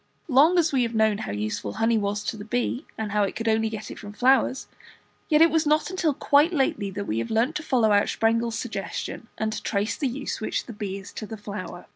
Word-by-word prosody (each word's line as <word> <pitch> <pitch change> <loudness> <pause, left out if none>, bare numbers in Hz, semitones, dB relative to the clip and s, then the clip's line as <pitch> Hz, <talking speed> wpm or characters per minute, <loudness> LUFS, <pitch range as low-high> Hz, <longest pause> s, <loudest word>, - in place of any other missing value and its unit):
Long 305 +5 +5
as 330 -3 +3
we 260 - +3
have 235 -1 -1
known 220 -1 +3
how - - -4
useful 105 0 -3
honey 225 +1 +2
was 205 0 -2
to 210 - -3
the 210 - -8
bee, 245 +5 -2
and 220 -2 -3
how 210 0 +2
it 200 - 0
could 225 - -3
only 220 0 +2
get 215 -1 -6
it - - -9
from 205 -1 -9
flowers, 260 +2 +2 0.6
yet 310 0 +6
it 330 - +5
was 320 -1 +2
not 305 +1 +3
till 320 -6 +1
quite 290 +6 +4
lately 265 - 0
that 200 +1 -5
we 110 - -1
have 115 - -3
learned 235 +7 +1
to - - -5
follow 245 -8 +2
out 205 0 +3
Sprengel's 230 0 +1
suggestion, 220 0 -5
and 220 0 -1
to 215 - -4
trace 205 +1 -1
the 280 - -1
use 265 0 -4
which 220 - -2
the 235 - -8
bee 205 -2 -4
is 195 - -11
to 215 - -6
the 220 - -7
flower. 205 -3 -7
225 Hz, 245 wpm, -25 LUFS, 205-265 Hz, 0.6 s, yet